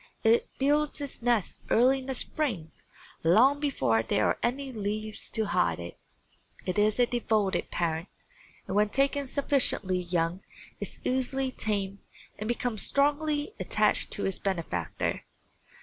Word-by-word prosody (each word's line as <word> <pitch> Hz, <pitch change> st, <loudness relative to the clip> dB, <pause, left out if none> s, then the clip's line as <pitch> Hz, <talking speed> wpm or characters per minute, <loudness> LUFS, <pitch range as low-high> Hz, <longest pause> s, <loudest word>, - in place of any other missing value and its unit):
It 225 Hz, +1 st, +3 dB
builds 295 Hz, +2 st, +1 dB
its 285 Hz, -3 st, -3 dB
nest 230 Hz, -5 st, 0 dB
early 255 Hz, +4 st, +4 dB
in 260 Hz, -, -10 dB
the 265 Hz, -, -1 dB
spring, 215 Hz, -, -2 dB, 0.5 s
long 245 Hz, +12 st, +5 dB
before 250 Hz, -, +1 dB
there 105 Hz, -1 st, +1 dB
are -, -, +1 dB
any 265 Hz, +3 st, -1 dB
leaves 215 Hz, -1 st, -4 dB
to 220 Hz, -1 st, +1 dB
hide 85 Hz, -, +1 dB
it. 85 Hz, 0 st, -7 dB, 0.7 s
It 185 Hz, +3 st, -1 dB
is 210 Hz, +3 st, +2 dB
a 245 Hz, -, +6 dB
devoted 220 Hz, -5 st, 0 dB
parent 165 Hz, 0 st, -2 dB, 0.6 s
and -, -, -4 dB
when 210 Hz, 0 st, +3 dB
taken 275 Hz, +3 st, +1 dB
sufficiently 255 Hz, -9 st, +2 dB
young 175 Hz, 0 st, -1 dB, 0.4 s
is -, -, -4 dB
easily 260 Hz, +1 st, 0 dB
tamed 200 Hz, -4 st, -2 dB, 0.4 s
and 215 Hz, -, -4 dB
becomes 240 Hz, -2 st, -1 dB
strongly 295 Hz, +4 st, +1 dB
attached -, -, +2 dB
to -, -, -2 dB
its 195 Hz, -, 0 dB
benefactor. 165 Hz, -, -2 dB
220 Hz, 140 wpm, -28 LUFS, 190-270 Hz, 0.7 s, a